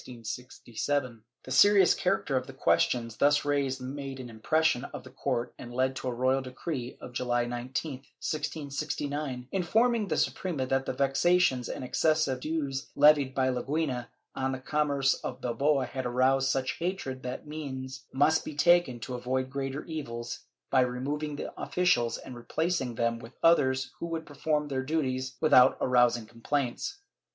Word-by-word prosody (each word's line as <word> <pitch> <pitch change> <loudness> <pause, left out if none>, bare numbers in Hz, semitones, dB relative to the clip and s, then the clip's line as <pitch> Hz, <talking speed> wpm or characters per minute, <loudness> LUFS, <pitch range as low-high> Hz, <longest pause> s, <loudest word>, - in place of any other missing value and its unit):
^ 125 +2 -4 0.2
The 130 - -9
serious 200 +3 +6
character - - 0
of - - 0
the - - -9
questions 115 -3 +1
thus 145 +1 +3
raised 140 -2 0
made 135 +1 -5
an 125 -2 -7
impression 130 +4 +1
on - - -7
the 130 - -13
court 125 -2 -2
and 120 - -8
led 130 +2 0
to - - -4
a - - 0
royal 130 +2 +1
decree 130 0 -5
of 125 - -10
July 120 -1 0
19, 125 +5 -3
1669, 145 -2 -4
informing 220 +4 +2
the - - -1
Suprema 160 -8 -1
that 135 +1 0
the - - -1
vexations 140 -2 +2
and - - -5
excessive 145 0 +1
dues 140 -2 -3
levied 145 -2 +5
by 130 -1 +2
Leguina 130 -1 -1 0.3
on 135 0 -1
the - - -2
commerce 140 0 +1
of 130 0 -4
Bilbao 140 +3 +1
had 130 0 -3
aroused 130 +2 +3
such 130 -1 -1
hatred 170 -7 -3
that 125 +3 -5
means 135 -3 -6
must 155 +4 +3
be 150 - -7
taken 170 -5 +4
to 125 - -5
avoid 130 +1 -2
greater 135 +1 -3
evils, 120 -7 -5 0.3
by 130 - +5
remov 130 +4 -2
ing 150 -1 -3
the - - -6
officials 175 -11 +2
and 130 - -9
replacing 135 +1 -1
them 115 0 0
with 115 +2 -11
others 130 -6 +4
who 170 - -3
would 165 -1 -4
perform 150 +1 -1
their 135 -2 -1
duties 130 -3 -2
without 140 -5 +6
arousing 120 -2 +3
complaints. 125 - -3
135 Hz, 160 wpm, -29 LUFS, 125-150 Hz, 0.3 s, serious